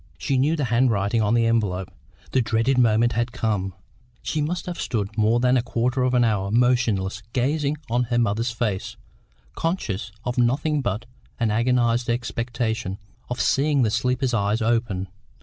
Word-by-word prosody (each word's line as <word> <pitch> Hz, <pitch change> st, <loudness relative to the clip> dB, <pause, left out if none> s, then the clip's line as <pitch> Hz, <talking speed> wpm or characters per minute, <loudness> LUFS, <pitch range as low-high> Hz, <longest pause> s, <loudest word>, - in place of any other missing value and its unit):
She 135 Hz, -, -1 dB
knew 150 Hz, +5 st, +2 dB
the 150 Hz, -4 st, -1 dB
handwriting 115 Hz, -3 st, +2 dB
on 105 Hz, +2 st, +2 dB
the 115 Hz, -1 st, +3 dB
envelope. 100 Hz, -5 st, 0 dB, 0.4 s
The 130 Hz, -, +3 dB
dreaded 115 Hz, +3 st, +1 dB
moment 115 Hz, 0 st, +3 dB
had 120 Hz, +1 st, -1 dB
come. 100 Hz, -5 st, -2 dB, 0.5 s
She 155 Hz, -, -1 dB
must 165 Hz, +4 st, -2 dB
have 180 Hz, -1 st, -5 dB
stood 105 Hz, -5 st, -2 dB
more 110 Hz, +2 st, +3 dB
than 125 Hz, +1 st, +3 dB
a -, -, +3 dB
quarter 125 Hz, +2 st, -1 dB
of 125 Hz, 0 st, +2 dB
an 120 Hz, -, +4 dB
hour, 100 Hz, -4 st, +1 dB
motionless, 115 Hz, -4 st, +1 dB
gazing 145 Hz, +3 st, 0 dB
on 120 Hz, +2 st, +1 dB
her 120 Hz, 0 st, -1 dB
mother's 115 Hz, +1 st, +1 dB
face, 110 Hz, -5 st, -3 dB, 0.6 s
conscious 110 Hz, -, -2 dB
of 125 Hz, +1 st, -1 dB
nothing 140 Hz, +5 st, +1 dB
but 115 Hz, -2 st, -2 dB, 0.3 s
an 115 Hz, -3 st, +1 dB
agonised 120 Hz, +1 st, +1 dB
expectation 115 Hz, -3 st, -2 dB, 0.3 s
of 125 Hz, -, -3 dB
seeing 140 Hz, -1 st, +2 dB
the 110 Hz, -, +1 dB
sleeper's 125 Hz, +3 st, 0 dB
eyes 105 Hz, 0 st, +1 dB
open. 110 Hz, -4 st, 0 dB
120 Hz, 165 wpm, -23 LUFS, 110-125 Hz, 0.6 s, an